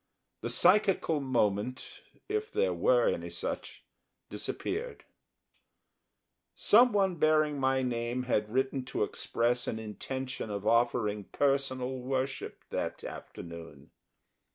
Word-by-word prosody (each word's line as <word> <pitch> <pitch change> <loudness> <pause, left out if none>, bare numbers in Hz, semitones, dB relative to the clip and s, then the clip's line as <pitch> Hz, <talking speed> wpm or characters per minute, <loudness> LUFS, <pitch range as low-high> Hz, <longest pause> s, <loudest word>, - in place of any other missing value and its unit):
The 115 - -3
psychical 180 - +4
moment, 120 -3 -1 0.3
if 430 +2 -2
there 475 +3 +1
were - - +3
any 485 - -1
such, - - -5 0.5
disappeared. 465 +5 -4 1.5
Someone 205 -5 +5
bearing 155 -2 +3
my 130 0 +2
name 120 0 -1
had 105 -4 0
written 130 +1 0
to 125 - -1
express 120 +3 0
an 110 - -2
intention 125 +4 -5
of 100 0 -4
offering 110 -3 +2
personal 130 -2 0
worship 130 +1 -3
that - - -3
afternoon. 85 -5 -9
130 Hz, 105 wpm, -30 LUFS, 115-155 Hz, 1.5 s, Someone